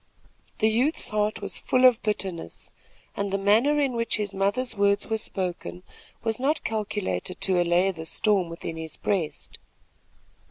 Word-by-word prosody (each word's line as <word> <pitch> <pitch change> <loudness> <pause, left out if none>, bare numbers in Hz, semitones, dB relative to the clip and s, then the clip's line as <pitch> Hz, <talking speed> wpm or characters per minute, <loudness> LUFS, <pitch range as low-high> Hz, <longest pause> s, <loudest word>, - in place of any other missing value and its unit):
The 220 - +3
youth's 250 +8 +1
heart 210 0 0
was - - -3
full 255 0 +3
of 250 -3 +6
bitterness, 190 - -4 0.4
and 200 -1 -2
the 195 - +1
manner 225 +10 +3
in 275 -3 +1
which 230 -4 0
his 205 -2 -2
mother's 205 +6 0
words 200 0 +2
were 220 -1 -1
spoken 180 -3 -4 0.4
was 225 0 -1
not 290 +4 0
calculated 205 - -3
to 185 -2 +3
allay 175 +2 +3
the 160 -3 -7
storm 195 -1 +2
within 165 -1 -6
his 160 -1 -6
breast. 185 -7 -3
205 Hz, 155 wpm, -26 LUFS, 185-225 Hz, 0.4 s, of